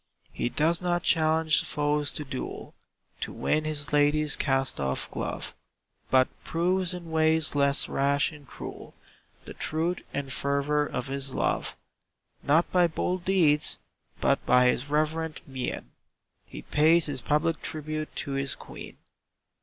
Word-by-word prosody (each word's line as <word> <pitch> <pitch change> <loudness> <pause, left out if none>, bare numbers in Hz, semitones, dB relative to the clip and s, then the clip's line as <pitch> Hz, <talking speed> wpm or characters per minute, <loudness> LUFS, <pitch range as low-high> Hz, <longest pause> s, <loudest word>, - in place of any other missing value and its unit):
He - - -1
does 165 +6 +1
not 175 -1 0
challenge 160 -1 +3
foes 145 -1 0
to 150 - -4
duel, 135 -2 -6 0.5
To - - -3
win 155 0 0
his 150 -1 -2
lady's 150 +1 +3
cast 135 - 0
off 65 -1 -1
glove, - - -4 0.6
But 130 -1 +4 0.2
proves 180 +2 0
in 170 -2 -9
ways 160 -1 +2
less 140 0 +4
rash 140 +3 +1
and 145 -3 -14
cruel, - - -9 0.5
The - - -8
truth 165 +3 -2
and 140 -2 -3
fervor 140 +1 +1
of 125 - -4
his 135 -1 -3
love. - - -1 0.6
Not 160 +4 +2
by 180 -1 +4
bold 175 +2 -2
deeds, 160 -6 +3 0.4
but - - +1
by 125 0 +5
his 130 +3 -1
reverent 155 +1 -1
mien, 130 - -5 0.6
He - - -9
pays 160 +3 +4
his 135 -4 -3
public 155 +4 0
tribute 155 -3 -4
to 140 - -5
his 135 0 -1
Queen. - - -11
150 Hz, 140 wpm, -27 LUFS, 140-160 Hz, 0.6 s, by